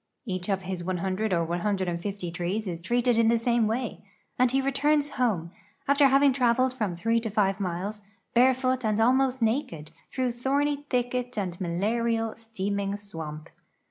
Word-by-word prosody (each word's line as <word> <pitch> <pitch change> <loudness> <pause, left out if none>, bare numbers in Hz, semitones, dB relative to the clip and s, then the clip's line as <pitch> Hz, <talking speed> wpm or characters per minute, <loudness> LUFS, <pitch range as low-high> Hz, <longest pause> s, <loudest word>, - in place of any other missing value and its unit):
Each 185 -3 -4
of 190 -1 0
his 180 -1 -4
100 185 +4 -1
or 170 -2 +2
150 180 +1 -2
trees 180 +5 -2
is 170 -3 -5
treated 240 +4 +2
in 230 - +4
the 230 +1 +4
same 235 -1 +2
way, 235 +2 -3 0.4
and 255 0 +5
he 265 +2 +2
returns 285 +2 +2
home, 200 -10 0 0.4
after 280 0 +5
having 275 0 +5
traveled 255 0 +2
from 210 -8 -2
3 230 +6 +1
to 225 -1 -3
5 200 -1 +1
miles, 195 +3 -3 0.3
barefoot 255 +1 +3
and 215 -1 +1
almost 260 +1 +3
naked, 195 - -1 0.2
through 255 -2 0
thorny 285 +4 -1
thicket 250 -1 -1
and 185 -3 -3
malarial, 225 +6 0
steaming 200 -3 -3
swamp. 160 -7 -8
225 Hz, 155 wpm, -27 LUFS, 185-250 Hz, 0.4 s, and